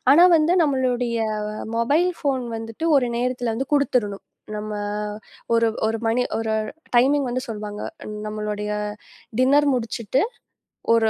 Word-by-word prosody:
ஆனா 325 +5 +8
வந்து 315 +2 +3
நம்மளுடைய 250 -4 +1 0.6
மொபைல் 295 +10 +3
போன் 265 -3 0
வந்துட்டு 225 +6 -6
ஒரு 260 -3 +3
நேரத்துல 245 -1 -1
வந்து 265 +4 -3
குடுத்துறணும். 245 -8 +1 0.3
நம்ம 210 0 -4 0.8
ஒரு 230 0 +4 0.2
ஒரு 225 0 0
மணி 230 +2 +2
ஒரு 225 -1 -1 0.4
டைமிங் 275 +4 +4
வந்து 250 +1 -1
சொல்லுவாங்க. 210 -2 -5 0.5
நம்மளுடைய 210 -1 -3 0.7
டின்னர் 280 +3 +5
முடிச்சிட்டு 230 +1 -1 0.7
ஒரு 225 -1 +4
240 Hz, 120 wpm, -23 LUFS, 220-265 Hz, 0.8 s, ஆனா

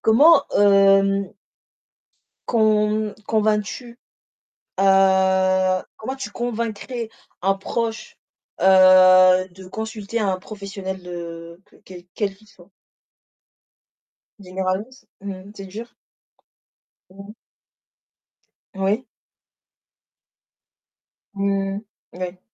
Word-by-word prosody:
comment 280 +7 +6
hem 195 -1 +4 1.2
con 215 -1 +1
convaincs-tu? 220 +2 -1 0.8
Heu, 190 -1 +3
comment 260 +5 -5
tu 265 -6 -7
convaincrais 235 0 -4 0.3
un 195 +2 +2
proche, 225 +3 -4 0.4
heu, 185 -1 +6
de 185 +1 -14
consulter 220 +2 -5
un 195 -3 0
professionnel 195 -2 -7
de 170 -1 -9
que - - -24
quel 180 -1 -12
quel 200 -3 -2
qu'il 215 +2 -23
soit? 180 -2 -20 1.7
Généraliste? 190 +6 -5
Mmh, 195 0 -8
c'est 195 - -9
dur? 220 +5 -9 1.2
Mmh. 200 +2 -12 1.4
Oui. 200 +6 -1 2.3
Mmh. 195 0 -1 0.3
Moui. 180 0 -6
195 Hz, 75 wpm, -21 LUFS, 185-215 Hz, 2.3 s, comment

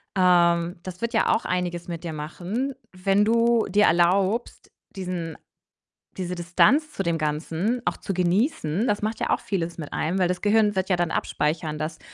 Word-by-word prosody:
Ähm, 175 -1 +3
das 185 +1 -8
wird 235 +1 -2
ja 225 - +2
auch - - -2
einiges 175 -1 -2
mit 170 0 -6
dir 165 - -4
machen, 180 - -4 0.2
wenn 195 +2 +2
du 230 0 +3
dir 205 +2 +4
erlaubst, 190 +6 +1 0.2
diesen 180 -4 -4 0.8
diese 180 -1 -3
Distanz 255 - +3
zu 195 - -3
dem 170 -1 0
Ganzen 160 +10 -1
auch - - 0
zu 195 - -5
genießen. 180 - +1
Das 210 -4 0
macht 215 +1 -3
ja - - -1
auch - - +2
vieles 170 -4 -3
mit 155 -4 -7
einem. 180 +5 -1
Weil 180 - +3
das 180 0 -2
Gehirn 210 0 +3
wird 190 0 -1
ja 180 - +2
dann 175 -1 0
abspeichern, 155 0 -1
dass 155 +1 -4
180 Hz, 185 wpm, -24 LUFS, 170-210 Hz, 0.8 s, dir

